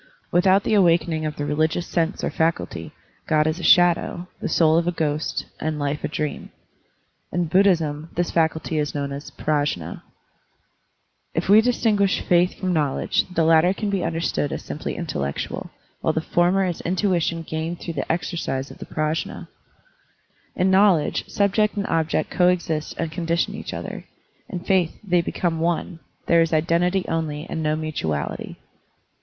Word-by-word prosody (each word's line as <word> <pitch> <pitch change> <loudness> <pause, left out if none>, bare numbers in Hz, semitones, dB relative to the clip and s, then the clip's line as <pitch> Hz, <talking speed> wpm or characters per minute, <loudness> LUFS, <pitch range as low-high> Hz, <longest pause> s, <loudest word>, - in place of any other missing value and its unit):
Without 190 +2 +4
the - - 0
awakening 170 -5 +3
of 150 - -5
the 145 - -3
religious 155 +4 0
sense 165 +2 -1
or - - 0
faculty, 160 - -1 0.4
Grod 155 -1 +3
is 155 +2 -1
a - - -7
shadow, 175 0 +4
the - - -2
soul 160 0 +4
a 170 +1 0
ghost, 155 -2 -2
and 155 0 -2
life 145 0 -2
a - - 0
dream. 150 0 -4 0.8
In 175 +1 0
Buddhism 165 -4 +2
this 175 0 0
faculty 160 -1 0
is 150 0 -2
known 140 -1 -2
as 140 +2 -6
Prajnd, 145 - -2 1.3
If 170 +3 -1
we 210 +2 +8
distinguish 215 -5 +2
faith 175 +1 +2
from 185 -1 -2
knowledge, 150 -4 +1
the 170 -2 +1
latter 165 +3 +4
can 210 -1 -2
be 195 -2 0
understood 165 -3 -1
as - - -4
simply 150 - -5
intellectual, 70 - -4 0.3
while 160 - +1
the 160 - 0
former 175 +4 +2
is 175 -3 -3
intuition 175 -3 0
gained 160 +2 -4
through 170 - -5
the 140 0 -2
exercise 160 -5 -2
of - - -13
the - - -8
PrajM. 155 +1 -2 1.1
In 190 +1 +2
knowledge 190 -6 +3
subject 210 +1 +2
and 200 -1 -1
object 160 -1 0
coexist 175 -4 +1
and 165 -1 -2
condition 170 +1 -1
each - - -6
other; - - -6 0.4
in 180 - -5
faith 180 -3 +1
they 180 -3 +2
become 165 -1 -2
one, 170 +1 -1 0.3
there 170 0 +4
is 165 0 +1
identity 175 +4 +2
only 155 -2 -2
and 160 - -4
no 155 0 +1
mutuality. 110 - -3
165 Hz, 160 wpm, -23 LUFS, 155-180 Hz, 1.3 s, we